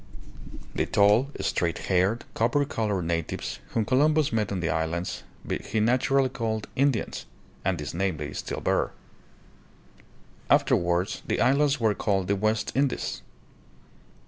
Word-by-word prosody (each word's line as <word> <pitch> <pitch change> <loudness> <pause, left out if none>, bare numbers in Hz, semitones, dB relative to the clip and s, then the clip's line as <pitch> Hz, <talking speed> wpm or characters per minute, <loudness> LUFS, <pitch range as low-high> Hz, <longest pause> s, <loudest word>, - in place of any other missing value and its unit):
The - - 0
tall, 105 +6 +4
straight 85 -1 0
haired, 95 +5 +1
copper 120 +6 +2
colored 105 -8 -1
natives, 85 -1 -3
whom 110 - -1
Columbus 150 +3 +3
met 105 -3 0
on 95 - -1
the 85 - -1
islands, 80 +2 -2 0.4
he 110 - -1
naturally 130 +4 +3
called 115 -4 -3
"In 140 +2 +4
dians";' 115 - -4 0.4
and 95 -1 +1
this 75 -1 -5
name 95 -1 -1
they 75 0 -5
still - - -4
bear. - - 0 1.6
Afterwards 85 +1 +2
the - - 0
islands 140 +1 +3
were 110 -2 +3
called 95 -2 0
the 100 - +3
"West 110 +2 0
Indies." 135 0 0
105 Hz, 135 wpm, -26 LUFS, 90-130 Hz, 1.6 s, tall